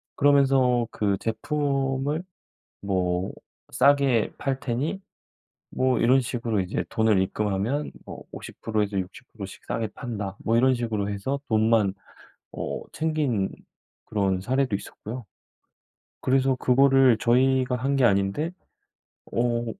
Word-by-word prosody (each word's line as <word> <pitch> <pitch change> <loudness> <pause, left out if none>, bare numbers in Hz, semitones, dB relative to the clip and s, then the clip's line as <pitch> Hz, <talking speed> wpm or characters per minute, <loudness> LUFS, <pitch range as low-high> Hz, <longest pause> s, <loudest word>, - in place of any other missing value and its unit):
그러면서 135 -4 +4
그 100 -2 0
"제품을 140 +4 -1 0.6
뭐 90 -2 -1 0.4
싸게 140 -6 +3
팔 135 -1 -2
테니" 140 +10 -2 0.7
뭐 130 0 +1
이런 130 +3 +5
식으로 115 -4 -2
이제 95 +2 -2
"돈을 110 -3 +3
입금하면 105 +8 -1
뭐 - - -9
50 - - -10
프로에서 105 -3 0
60 95 +8 -7
프로씩 100 -3 -9
싸게 115 -1 -2
판다." 105 -6 -5
뭐 115 +1 +2
이런 130 +2 +4
식으로 110 -4 -2
해서 130 +8 -3
돈만 110 -3 +3 0.6
어 - - -4
챙긴 150 -11 0 0.6
그런 95 -3 0
사례도 130 +1 0
있었고요. 115 +4 -7 1.0
그래서 135 0 +2
그거를 130 -1 +4
저희가 125 +2 +2
한 135 +3 0
게 135 - +2
아닌데 100 - +1 0.8
어 120 0 0
120 Hz, 235 characters per minute, -25 LUFS, 105-135 Hz, 1.0 s, 이런